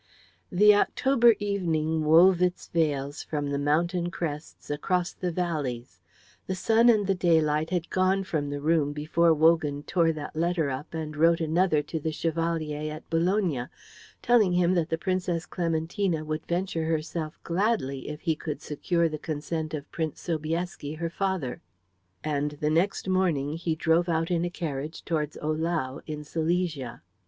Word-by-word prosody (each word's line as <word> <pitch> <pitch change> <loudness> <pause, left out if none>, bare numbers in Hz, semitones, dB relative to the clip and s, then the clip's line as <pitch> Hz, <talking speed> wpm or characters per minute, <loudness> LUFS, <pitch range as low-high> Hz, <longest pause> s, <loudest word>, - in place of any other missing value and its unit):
The 210 +3 +6
October 240 +2 +4
evening 165 -6 0
wove 170 +4 +6
its 180 0 0
veils 145 -3 0
from 145 -2 -3
the 140 - -1
mountain 170 +5 +1
crests 155 -3 -5
across 180 +4 -1
the 180 -1 -3
valleys; 145 - -3 0.5
the 190 - -1
sun 225 +5 +4
and 215 -3 +4
the 195 - +2
daylight 160 -4 +2
had 175 -2 -2
gone 190 +1 +2
from 155 -6 -2
the 145 0 -4
room 150 -2 +2
before 160 +3 +2
Wogan 155 -2 +3
tore 170 -1 +2
that 155 -1 -7
letter 165 -3 0
up 135 +5 -6
and 155 -1 -4
wrote 165 +2 +4
another 160 -1 +2
to 160 - -4
the 160 +1 -2
Chevalier 155 -2 -2
at 155 - -9
Bologna, 165 - +1 0.6
telling 220 -7 +4
him 180 0 +3
that 170 -2 0
the 165 - 0
Princess 180 -1 -1
Clementina 165 0 -1
would 155 0 -4
venture 170 -2 -1
herself 160 0 -2
gladly 170 - -1
if 150 0 -7
he 160 -3 0
could 150 -2 -5
secure 165 +3 0
the 155 -1 -5
consent 155 +1 -3
of 145 -1 -8
Prince 160 -3 -3
Sobieski, 160 -2 -3
her 165 +1 -3
father. 185 -9 -2 0.6
And 150 -1 -1
the 150 0 +1
next 180 +5 +1
morning 170 -7 +1
he 165 -1 -2
drove 165 +2 +2
out 165 +1 0
in 170 -1 +1
a - - -1
carriage 155 -3 -5
towards 150 -3 -2
Ohlau 155 -3 -1
in 150 -1 -5
Silesia. 160 -4 -2
165 Hz, 160 wpm, -27 LUFS, 150-175 Hz, 0.6 s, The